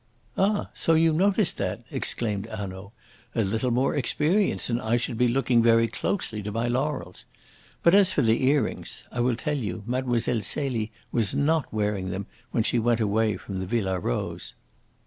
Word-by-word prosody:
"Ah! 205 +2 +1
so 165 - +2
you 160 0 +4
noticed 195 +2 +2
that!" - - -3
exclaimed 105 -4 -2
Hanaud. 100 -2 -7 0.4
"A 115 - +2
little 110 +5 0
more 125 +3 +1
experience 155 - +1
and 120 0 -1
I 110 +2 +1
should 120 0 -2
be 125 +2 +3
looking 125 -1 +3
very 115 0 +4
closely 115 - -3
to 105 +1 -5
my 115 +3 -1
laurels. 130 -6 -2 0.6
But 170 - +5
as 195 -2 +6
for - - +1
the 115 +2 +2
earrings 140 -5 0
I - - -5
will 120 0 +2
tell 145 +4 -2
you. 105 -3 -4
Mlle. 125 0 0 0.2
Celie 115 -1 -2 0.2
was 110 -4 +1
not 155 +1 +1
wearing 105 -3 -1
them 95 +2 -4 0.2
when 115 - +1
she 120 - +1
went 120 0 +2
away 110 0 +1
from 95 -2 -6
the 95 - -4
Villa 95 -4 0
Rose." - - -3
120 Hz, 175 wpm, -26 LUFS, 105-140 Hz, 0.6 s, as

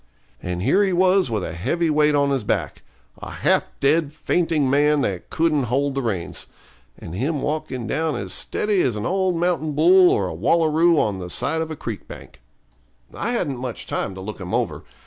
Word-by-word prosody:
And 90 0 -4
here 200 - +3
he 190 -2 +1
was 185 -2 +3
with 110 -4 -2
a - - -5
heavy 155 - 0
weight 150 0 +3
on 140 -1 +2
his 135 -5 0
back - - -2 0.4
a - - -7
half - - +1
dead, 145 +1 +2
fainting 160 -3 0
man, 145 +2 +3
that 95 -8 -3
couldn't 155 -4 +1
hold 135 +4 0
the 135 - -1
reins 100 -8 -3 0.5
and 80 - -9
him 140 - -2
walking 135 -5 -3
down 155 +5 -1
as - - -4
steady 210 -3 0
as 125 -5 0
an 105 0 -4
old 190 -1 +1
mountain 165 -3 0
bull 180 +5 +6
or 100 - +1
a 90 - -5
wallaroo 160 - +3
on 100 -3 0
the 90 -1 -6
side 160 - -1
of 160 - -3
a 160 - -5
creek 115 -7 -7
bank. - - -12 0.7
I - - -3
hadn't 150 - -1
much 125 -3 -5
time 95 - -3
to 95 - -8
look 105 +1 -7
him 90 -1 -3
over. - - -2
145 Hz, 200 wpm, -22 LUFS, 115-165 Hz, 0.7 s, bull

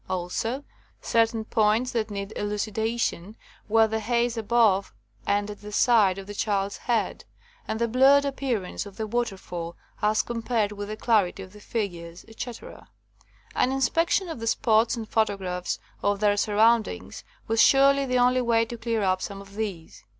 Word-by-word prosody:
Also, 190 +9 -2 0.4
certain 225 -1 +1
points 220 +3 +2
that 225 -2 -1
needed 200 0 -6
elucidation 215 -1 -2 0.3
were 225 +1 +5
the 220 0 -2
haze 235 +2 0
above 220 -3 +2 0.4
and 205 +1 +1
at 205 - -11
the 210 0 -9
side 205 -4 +4
of 195 - -7
the 205 - -8
child's 200 -1 -1
head, 235 -2 -1 0.4
and 220 - -3
the 235 - +1
blurred 270 +4 +5
appearance 255 -9 -3
of 200 - -13
the 220 - -2
waterfall 195 -7 -4 0.2
as 215 0 +2
compared 230 -3 -1
with 205 0 -6
the 215 +1 -5
clarity 205 -5 +1
of 185 +1 -13
the 210 - -13
figures, 175 -6 -5
etc. 230 +1 -9 0.7
An 255 - +1
inspection 330 +8 +1
of 325 -7 -6
the 230 - -4
spots 225 +1 +2
and 225 -2 -6
photographs 195 -5 -1 0.2
of 205 0 +1
their 205 -1 +3
surroundings 210 - +1 0.2
was 225 0 +3
surely 275 0 +5
the 250 0 +1
only 250 +1 +3
way 230 -1 +2
to 235 0 -8
clear 225 -2 -1
up 185 -1 +1
some 200 -1 -5
of 200 0 -13
these. 200 -6 -6
220 Hz, 165 wpm, -26 LUFS, 200-235 Hz, 0.7 s, were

